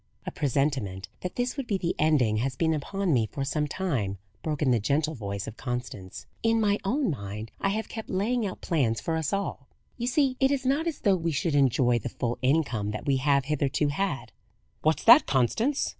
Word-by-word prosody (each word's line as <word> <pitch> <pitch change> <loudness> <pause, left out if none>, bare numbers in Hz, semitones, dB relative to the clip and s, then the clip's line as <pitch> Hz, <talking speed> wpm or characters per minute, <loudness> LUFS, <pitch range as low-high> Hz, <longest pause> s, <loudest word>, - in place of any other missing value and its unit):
"A - - -3
presentiment 130 -10 -1
that 180 - -5
this 245 0 -1
would 270 -3 -3
be 200 - +1
the 175 -2 -1
ending 140 -9 +3
has 130 +3 -1
been 160 +3 +1
upon 180 +4 -1
me 115 -4 +2
for 140 +4 -4
some 150 +2 -1
time," 135 - -2 0.2
broke 150 -2 -2
in 130 - +3
the 120 - +3
gentle 150 +8 0
voice 100 -6 -4
of 110 - -8
Constance. 120 -7 -5 0.2
"In 225 0 +2
my 205 -1 +2
own 250 - +1
mind 105 -3 -6
I 195 - +2
have 215 +2 -2
kept 220 -1 -7
laying 220 +6 0
out 195 -3 -4
plans 130 -10 +1
for 165 - -2
us 160 -2 -1
all. 200 -9 -3 0.3
You 240 - -1
see, 260 0 +2
it 265 0 +4
is 275 -2 -1
not 285 +6 +1
as 325 - -3
though 200 -3 +4
we 165 -2 -1
should 155 +2 -1
enjoy 130 -3 +3
the - - -5
full 120 -1 -3
income 125 -7 +1
that 105 0 -5
we 140 -2 +2
have 140 0 +2
hitherto 145 0 0
had." 155 -1 -2 0.5
"What's 155 +1 +1
that, 240 +6 +8
Constance?" 220 - +1
150 Hz, 210 wpm, -27 LUFS, 125-200 Hz, 0.5 s, that